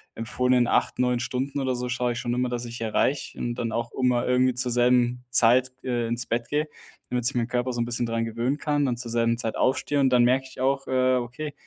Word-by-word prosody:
empfohlenen 125 +1 +1
8, - - +1
9 125 -1 +2
Stunden 130 +3 -3
oder 130 -1 0
so 125 0 -3
schaue 125 0 -1
ich 120 - -5
schon 120 - -2
immer, 125 0 0
dass 120 0 -3
ich 120 0 -8
erreiche 115 +5 -1
und 120 0 -2
dann 115 -2 -3
auch 115 +1 -3
mal 125 -1 +2
irgendwie 125 0 +3
zur 125 0 0
selben 125 0 +2
Zeit, 125 +2 +4
äh, 120 -2 -1
ins 120 +1 -2
Bett 115 0 -2
gehe, 150 +1 0 0.4
damit 125 -1 -1
sich 130 +1 +1
meinen 120 -1 0
Körper 125 +1 -1
so 120 - -4
'n 115 - 0
bisschen 120 0 -2
dran 115 0 -1
gewöhnen 115 +5 -1
kann, 145 -1 0
dann 125 -2 -1
zur 120 -1 -5
selben 115 0 +1
Zeit 115 -2 -3
aufstehe 140 +2 +1
und 135 - +4
dann 125 -1 +4
merke 130 +2 +2
ich 130 - -14
auch: 135 +1 0
„Äh, 130 0 +2
okay“, 125 +5 -5
125 Hz, 240 wpm, -25 LUFS, 120-130 Hz, 0.4 s, Zeit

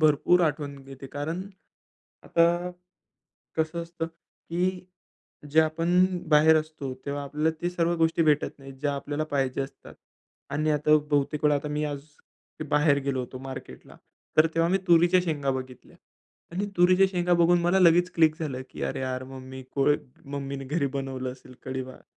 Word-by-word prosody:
भरपूर 155 +3 +4
आठवण 145 -1 -3
घेते, 135 0 -10
कारण 155 +6 -4 0.8
आता 170 +1 +2 0.9
कसं 160 +1 -1
असतं, 170 -1 -5
की 180 +2 -4 0.7
जे 155 - +6
आपण 165 +3 +3 0.2
बाहेर 155 +1 +6
असतो, 155 -4 -4
तेव्हा 145 0 -3
आपल्याला 150 +3 0
ते 175 - 0
सर्व 170 -1 0
गोष्टी 165 0 +2
भेटत 150 -2 +1
नाहीत, 135 0 -10
ज्या 145 -1 0
आपल्याला 145 +2 -3
पाहिजे 135 -3 -1
असतात. 135 - -9 0.6
आणि 155 +2 0
आता 150 +1 +4
बहुतेक 145 +1 +1
वेळा 150 -1 +4
आता 145 +1 -2
मी 150 +1 -1
आज 145 -2 -4 0.7
बाहेर 150 -1 +4
गेलो 135 -2 -1
होतो 125 +1 -6
मार्केटला. 135 0 -9 0.4
तर 155 +1 +7
तेव्हा 165 +1 +3
मी 190 - +4
तुरीच्या 175 +2 +5
शेंगा 145 -5 -1
बघितल्या 130 -1 -7 0.6
आणि 190 +4 -2
तुरीच्या 185 +2 +6
शेंगा 180 -1 +1
बघून 175 +1 +5
मला 175 +3 +3
लगेच 175 0 +5
क्लिक 160 -2 +4
झालं, 140 -5 -3
की - - -10
अरे, - - -2
यार, 130 0 -3
मम्मी 130 0 -9
को 135 -1 +1 0.4
मम्मीने 140 -1 -5
घरी 150 +2 0
बनवलं 135 -2 -3
असेल 130 0 -14
कढीभात. 130 0 -6
150 Hz, 155 wpm, -27 LUFS, 135-170 Hz, 0.9 s, तर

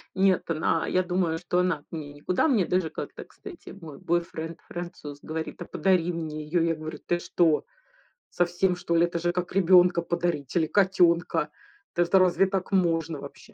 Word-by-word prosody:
нет, 190 -2 +2
она 160 0 0
я 185 0 +1
думаю, 175 -2 0
что 180 +1 -1
она 180 -4 +1
от 145 - -29
меня 150 -3 -6
никуда. 175 - 0
Мне 225 - +3
даже 180 -3 0
как-то, - - -7
кстати, 380 -4 -12
мой 165 -7 -11
бойфренд-француз 170 -2 -4
говорит: 160 0 -6
"А - - -4
подари 180 -3 +1
мне 155 -2 -5
её". 165 +3 0
Я 165 -1 +1
говорю: 155 0 -7
"Ты 175 0 0
что, 170 -2 +1 0.6
совсем, 175 +1 +1
что 175 -1 -2
ли? 170 +1 +5
Это 170 0 -3
же 175 +1 0
как 180 -1 -3
ребёнка 180 -2 +5
подарить 170 -5 -2
или 160 -2 +2
котёнка? 180 -3 +2 0.5
Да, 175 - +2
это 190 +2 +4
разве 185 +1 +4
так 190 0 -3
можно 165 -5 +1
вообще?" 140 0 -12
175 Hz, 175 wpm, -26 LUFS, 160-180 Hz, 0.6 s, ли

